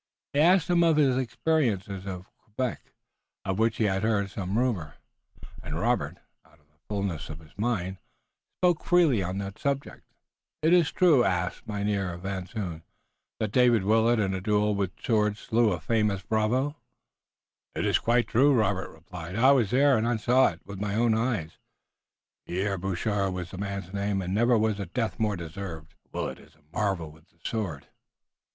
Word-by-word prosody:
He 140 - +1
asked 175 +2 +5
him 175 -1 +3
of 165 -2 +4
his 135 -4 +4
experiences 110 - -1
at 90 -2 -5 0.2
Quebec, 120 +3 -5 0.5
of 95 +1 -1
which 115 0 +2
he - - +1
had 95 -2 +1
heard 105 -3 0
some 100 0 -3
rumor, 105 - -1 0.7
and - - -5
Robert, - - 0 0.3
out - - -25
of 75 - -32
the 75 - -38
fullness 100 -7 -3
of 80 - -6
his 80 -2 -18
mind, 95 -4 -2 0.6
spoke 175 -3 +2
freely 165 - +4
on 90 +1 -3
that 100 0 -5
subject. 140 0 -2 0.6
"Is 165 0 +5
it - - -14
true," 165 -9 +5
asked 90 -3 -1
Mynheer 100 -4 -1
Van 95 0 -4
Zoon, 90 -6 -5 0.6
"that 110 -2 -1
David 120 -3 +4
Willet 110 +3 +3
in 95 -2 +1
a 95 - -3
duel 105 +1 +2
with 100 -2 -3
swords 105 -2 +1
slew 115 -1 +2
a 90 - -2
famous 105 +1 0
bravo?" 125 +7 0 1.0
"It's - - +2
quite 120 +1 +2
true," 140 +5 +4
replied 90 -4 -2
Robert. - - -3
"I - - +8
was 125 -8 +3
there, 135 0 +4
and 115 0 0
saw 125 +4 +4
it 85 0 -5
with 100 0 -8
my 105 -1 -1
own 115 0 +3
eyes. 110 -8 -1 0.9
Pierre 95 +2 -1
Boucher 95 +2 -1
was 90 -1 -5
the 95 - -8
man's 100 -2 -5
name, 100 -1 -1
and 90 +1 -3
never 120 +3 +4
was 110 -1 +1
a 100 - -4
death 110 +1 -2
more 105 -2 +1
deserved." 85 -2 -7 0.2
"Willet - - -4
is - - -19
a 80 - -29
marvel 95 -7 -1
with 80 +2 -20
the - - -34
sword." 90 -11 -3
105 Hz, 175 wpm, -27 LUFS, 95-120 Hz, 1.0 s, I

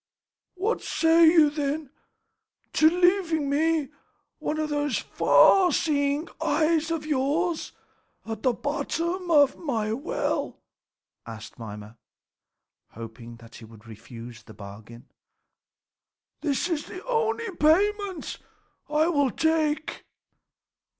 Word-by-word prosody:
"What 400 +6 -1
say 330 0 +4
you, 315 -3 +5
then, 295 -1 -3 0.8
to 315 - +5
leaving 325 -4 +1 0.5
one 310 - -3
of 310 0 -2
those 290 -2 -1
far 370 -3 +4
seeing 285 +1 0
eyes 320 +1 +1
of 325 -2 -3
yours 310 +4 -1 0.5
at 225 0 -6
the 255 - +2
bottom 330 +7 -3
of 290 -4 +4
my 225 -9 -2
well?" 275 +9 -3 0.7
asked 115 +1 -10
Mimer, 105 0 -9 1.0
hoping 115 +1 -10
that 115 0 -16
he 115 - -12
would 110 0 -17
refuse 115 +1 -11
the - - -15
bargain. 105 +4 -12 1.4
"This 290 +2 0
is 330 -5 -3
the 370 - -9
only 455 -4 -1
payment 390 +3 +1 0.5
I 305 +1 +2
will 285 -5 +2
take." 315 +1 -1
300 Hz, 105 wpm, -25 LUFS, 225-330 Hz, 1.4 s, you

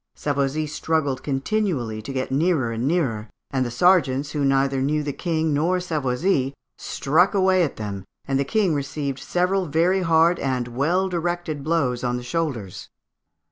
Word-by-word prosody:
Savoisy 140 +1 -1
struggled 150 -3 -1
continually 135 - -1
to 125 - -7
get 130 -1 -3
nearer 145 -4 +1
and 115 +3 -2
nearer, 125 -10 0 0.2
and 130 -1 +1
the 120 - -2
sergeants, 145 -1 +3
who 145 -2 -1
neither 135 0 +2
knew 150 +2 0
the 145 -1 -3
King 160 -2 -1
nor 170 +6 +1
Savoisy, 140 -3 0 0.2
struck 170 +8 +1
away 190 -1 +4
at 160 - 0
them, 100 -3 -5 0.2
and 135 -1 +1
the - - +2
King 190 +4 +1
received 140 -1 -3
several 180 +1 0
very 170 +6 +2
hard 165 0 +3
and 130 -3 -1
well 165 +10 +1
directed 175 -4 -3
blows 140 -6 0
on 125 0 0
the 125 - -6
shoulders. 125 - -3
145 Hz, 160 wpm, -23 LUFS, 130-170 Hz, 0.2 s, away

